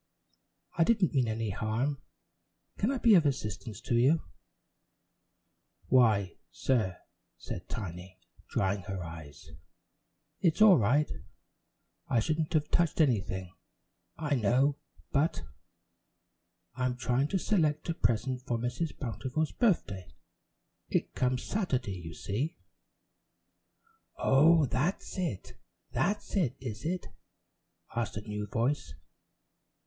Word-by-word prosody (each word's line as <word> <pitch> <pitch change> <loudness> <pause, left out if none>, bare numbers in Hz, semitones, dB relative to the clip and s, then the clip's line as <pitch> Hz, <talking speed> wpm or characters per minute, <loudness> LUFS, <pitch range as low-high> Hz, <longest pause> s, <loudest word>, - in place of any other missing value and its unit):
"I - - +7
didn't 200 -3 +3
mean 130 -4 +2
any 110 -1 -1
harm. 120 +7 -1 0.8
Can 210 - +2
I 275 - 0
be 235 -2 +5
of 175 -5 +7
assistance 110 -6 -3
to 125 -1 -3
you?" 135 +7 +4 1.7
"Why, 110 -8 +4
sir," 110 -9 0 0.4
said 90 - -7
Tiny, 95 -3 -6 0.3
drying 100 +1 0
her 95 -2 -4
eyes, 80 -3 -10 0.9
"it's 170 0 +2
all 210 -7 +8
right 140 +8 +3 1.0
I 120 - +2
shouldn't 155 +7 -1
have 150 -2 +1
touched 170 -2 +2
anything, 95 - +1 0.6
I 150 -3 -1
know, 130 +4 +2 0.3
but 150 +3 +1 1.3
I'm 125 0 -1
trying 125 +3 +1
to 190 - 0
select 155 -7 +1
a 165 - 0
present 125 0 0
for 120 -2 -2
Mrs. 125 +7 -3
Bountiful's 135 +5 -2
birthday. 100 - 0 0.8
It - - 0
comes 125 0 0
Saturday, 130 - -1
you 80 -2 -8
see 125 - -2 0.8
" 450 -1 -42
"Oh, 155 +3 +5
that's 160 +9 -1
it, 165 - -4 0.3
that's 205 +4 -1
it, 150 - +1
is 120 0 -6
it?" 180 +2 -2 0.9
asked 115 -3 -2
a - - -3
new 105 0 -3
voice. 120 +8 -1
125 Hz, 115 wpm, -30 LUFS, 105-155 Hz, 1.7 s, all